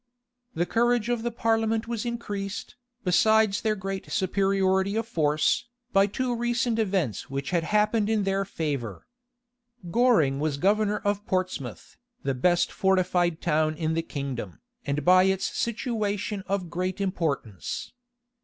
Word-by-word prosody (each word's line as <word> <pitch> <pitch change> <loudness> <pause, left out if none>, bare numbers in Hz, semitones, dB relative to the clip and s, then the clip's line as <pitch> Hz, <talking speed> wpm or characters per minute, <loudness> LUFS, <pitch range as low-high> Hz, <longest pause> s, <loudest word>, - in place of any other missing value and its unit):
The 175 - +1
courage 235 +3 +1
of 240 -2 0
the 240 - -1
parliament 225 -1 0
was 235 0 -3
increased, 205 -4 -4 0.3
besides 215 +2 +3
their 215 -1 +1
great 195 -1 -5
superiority 190 +1 +1
of 225 0 -1
force, 155 +2 +1 0.3
by 195 0 +5
two 245 +4 -2
recent 240 0 0
events 185 - -1
which 140 +2 -4
had 170 -2 +1
happened 210 +2 +2
in 220 -2 +2
their 195 0 +1
favor. 145 - -4 0.9
Goring 210 - +3
was 150 -1 -1
governor 210 +5 +2
of 205 0 0
Portsmouth, 185 - -3 0.3
the 135 - 0
best 175 +7 +2
fortified 180 -3 +1
town 155 -2 +1
in 160 0 -1
the 165 - +1
kingdom, 140 - -5 0.3
and 140 0 -1
by 185 +1 +6
its 190 0 +1
situation 210 -4 -2
of 190 -3 -2
great 185 +2 -2
importance. 160 - -3
195 Hz, 135 wpm, -26 LUFS, 165-220 Hz, 0.9 s, by